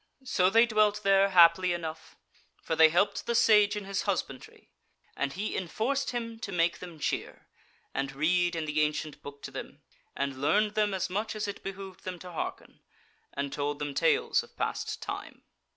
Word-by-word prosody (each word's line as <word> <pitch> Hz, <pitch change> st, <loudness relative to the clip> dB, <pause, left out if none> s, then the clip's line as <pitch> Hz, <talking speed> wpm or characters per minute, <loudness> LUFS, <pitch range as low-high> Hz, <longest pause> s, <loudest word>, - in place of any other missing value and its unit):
So 185 Hz, -8 st, +2 dB
they 230 Hz, +4 st, +6 dB
dwelt 215 Hz, -2 st, +2 dB
there 195 Hz, 0 st, +4 dB
happily 175 Hz, 0 st, +6 dB
enough; 160 Hz, -2 st, -6 dB, 0.5 s
for 160 Hz, -, -1 dB
they 160 Hz, 0 st, +7 dB
helped 175 Hz, +6 st, +1 dB
the 235 Hz, -, 0 dB
Sage 210 Hz, -2 st, +5 dB
in 205 Hz, -1 st, -5 dB
his 195 Hz, -1 st, -2 dB
husbandry, 170 Hz, -10 st, -4 dB, 0.4 s
and 140 Hz, -1 st, -2 dB
he 205 Hz, +4 st, -3 dB
enforced 245 Hz, +10 st, -1 dB
him 230 Hz, -2 st, -4 dB
to 205 Hz, -, -6 dB
make 170 Hz, -1 st, +1 dB
them 175 Hz, -3 st, -9 dB
cheer, 150 Hz, -, -3 dB, 0.5 s
and 135 Hz, 0 st, -2 dB
read 175 Hz, +5 st, +1 dB
in 160 Hz, -1 st, -2 dB
the 150 Hz, 0 st, 0 dB
ancient 150 Hz, 0 st, -2 dB
book 140 Hz, 0 st, -10 dB
to -, -, -6 dB
them, -, -, -8 dB, 0.3 s
and 135 Hz, -1 st, -3 dB
learned 210 Hz, +9 st, +3 dB
them 210 Hz, -2 st, +1 dB
as 185 Hz, -, -1 dB
much 210 Hz, +3 st, -2 dB
as 210 Hz, 0 st, -2 dB
it 205 Hz, -, -6 dB
behoved 195 Hz, -1 st, -8 dB
them 185 Hz, -1 st, -5 dB
to 180 Hz, +1 st, -10 dB
hearken; 165 Hz, -, -6 dB, 0.6 s
and 140 Hz, 0 st, -3 dB
told 145 Hz, 0 st, -2 dB
them 145 Hz, -1 st, -4 dB
tales -, -, +2 dB
of -, -, -17 dB
past -, -, -3 dB
time. -, -, -7 dB
185 Hz, 185 wpm, -29 LUFS, 155-210 Hz, 0.6 s, they